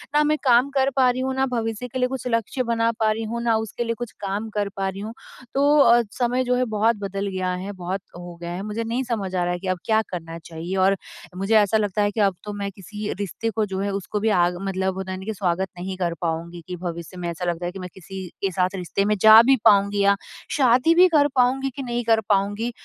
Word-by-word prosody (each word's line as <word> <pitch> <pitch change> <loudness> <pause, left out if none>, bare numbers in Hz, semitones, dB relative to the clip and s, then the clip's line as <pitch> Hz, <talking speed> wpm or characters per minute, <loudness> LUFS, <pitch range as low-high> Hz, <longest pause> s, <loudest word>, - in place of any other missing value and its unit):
ना 300 - +5
मैं 305 +1 +2
काम 250 0 +4
कर 270 0 +3
पा 260 -2 +5
रही 250 +1 -1
हूँ, 265 0 -1
ना 265 0 +2
भविष्य 230 -2 -3
के 255 +2 -5
लिए 250 - +2
कुछ 255 -1 -5
लक्ष्य 230 +2 -1
बना 230 -1 +1
पा 220 -1 +3
रही 220 +1 -2
हूँ, 235 +2 -3
ना 230 -1 +3
उसके 220 +2 -3
लिए 230 0 -2
कुछ 240 -2 -5
काम 200 +2 -3
कर 205 -1 0
पा 195 0 0
रही 190 +1 -7
हूँ। 220 +2 -6 0.4
तो 285 +2 +4
अ, 240 -3 +6
समय 250 +1 0
जो 250 0 +1
है 255 0 +1
बहुत 215 -2 -3 0.2
बदल 200 0 -3
गया 185 -1 -2
है 190 +2 -5
बहुत 185 +1 -4
हो 175 0 -9
गया 170 - -5
है। 180 - -4
मुझे 215 +2 -3
नहीं 235 +3 -2
समझ 215 -7 -3
आ 180 - +1
रहा 175 0 0
है 175 - -4
कि 190 - -7
अब 185 0 0
क्या 220 0 +3
करना 165 -2 -6
चाहिए? 165 +2 -6
और 190 +1 +3 0.4
मुझे 195 +4 +1
ऐसा 210 0 +4
लगता 210 -1 0
है 205 0 +2
कि 220 - -5
अब 195 -2 +3
तो 210 - -6
मैं 200 -1 -3
किसी 210 +2 -6
रिश्ते 205 +3 -3
को 220 0 0
जो 190 -2 -4
है 200 +1 -1
उसको 200 +2 -3
भी 220 +2 +1
आग 175 -3 +2
मतलब 190 0 -1
होता 190 0 -4
है 185 - -4
ना 220 +3 -4
स्वागत 190 -1 -1
नहीं 185 +1 -4
कर 175 -2 -1
पाऊँगी 170 +1 -3
कि 180 - -4
भविष्य 170 0 -6
में 175 -1 -4
ऐसा 170 +2 -4
लगता 175 0 -2
है 175 - -2
कि 195 - -9
मैं 180 -1 -6
किसी 190 0 -8
के 195 - 0
साथ 185 +2 0
रिश्ते 190 +2 -1
में 210 +1 +2
जा 220 +1 +10
भी 270 +2 +6
पाऊँगी 200 0 +5
या 200 0 +5 0.4
शादी 260 +4 +4
भी 365 +2 +7
कर 290 -1 +5
पाऊँगी 260 +2 +2
कि 275 - -5
नहीं 240 -1 -2
कर 225 -1 +3
पाऊँगी? 205 +3 +1
205 Hz, 265 wpm, -23 LUFS, 185-235 Hz, 0.4 s, जा